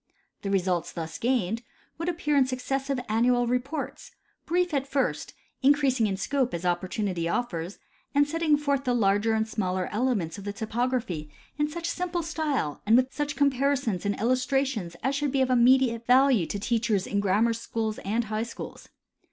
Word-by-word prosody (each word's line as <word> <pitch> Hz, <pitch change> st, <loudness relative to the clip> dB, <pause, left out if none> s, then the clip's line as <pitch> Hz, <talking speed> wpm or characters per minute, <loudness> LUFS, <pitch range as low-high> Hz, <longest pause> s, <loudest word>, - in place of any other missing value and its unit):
The 200 Hz, -, -3 dB
results 185 Hz, -3 st, 0 dB
thus 165 Hz, -2 st, -6 dB
gained 230 Hz, -3 st, 0 dB, 0.4 s
would 335 Hz, +1 st, -1 dB
appear 305 Hz, -4 st, 0 dB
in 270 Hz, -2 st, +4 dB
successive 270 Hz, +1 st, -2 dB
annual 245 Hz, +3 st, +3 dB
reports, 250 Hz, +6 st, -3 dB, 0.4 s
brief 355 Hz, 0 st, +1 dB
at 275 Hz, -1 st, 0 dB
first, 275 Hz, 0 st, -1 dB, 0.3 s
increasing 270 Hz, -4 st, +3 dB
in 195 Hz, -2 st, -2 dB
scope 260 Hz, +1 st, 0 dB
as 170 Hz, +1 st, -5 dB
opportunity 180 Hz, 0 st, -1 dB
offers, 175 Hz, -5 st, -2 dB, 0.4 s
and 285 Hz, 0 st, +4 dB
setting 320 Hz, -1 st, +2 dB
forth 280 Hz, -2 st, 0 dB
the 250 Hz, -2 st, +1 dB
larger 210 Hz, 0 st, +2 dB
and 220 Hz, 0 st, 0 dB
smaller 185 Hz, -4 st, -1 dB
elements 210 Hz, -7 st, -1 dB
of -, -, -9 dB
the 205 Hz, 0 st, -4 dB
topography 220 Hz, -7 st, -2 dB, 0.3 s
in 295 Hz, -, +2 dB
sucii 335 Hz, +3 st, -6 dB
simple 350 Hz, 0 st, -2 dB
style 300 Hz, -, -2 dB
and 225 Hz, +3 st, +6 dB
with 260 Hz, +1 st, +1 dB
such 295 Hz, -1 st, -2 dB
comparisons 275 Hz, -7 st, +1 dB
and 200 Hz, 0 st, 0 dB
illustrations 255 Hz, -5 st, 0 dB
as 265 Hz, +3 st, +1 dB
should 285 Hz, -1 st, 0 dB
be 270 Hz, -1 st, +2 dB
of 260 Hz, -, 0 dB
immediate 245 Hz, -1 st, +4 dB
value 250 Hz, -7 st, +5 dB
to -, -, -3 dB
teachers 215 Hz, -2 st, 0 dB
in 200 Hz, -, -1 dB
grammar 205 Hz, +4 st, +2 dB
schools 225 Hz, -1 st, -3 dB
and 220 Hz, +4 st, -1 dB
high 215 Hz, 0 st, -2 dB
schools. 230 Hz, 0 st, -7 dB
245 Hz, 170 wpm, -27 LUFS, 205-275 Hz, 0.4 s, and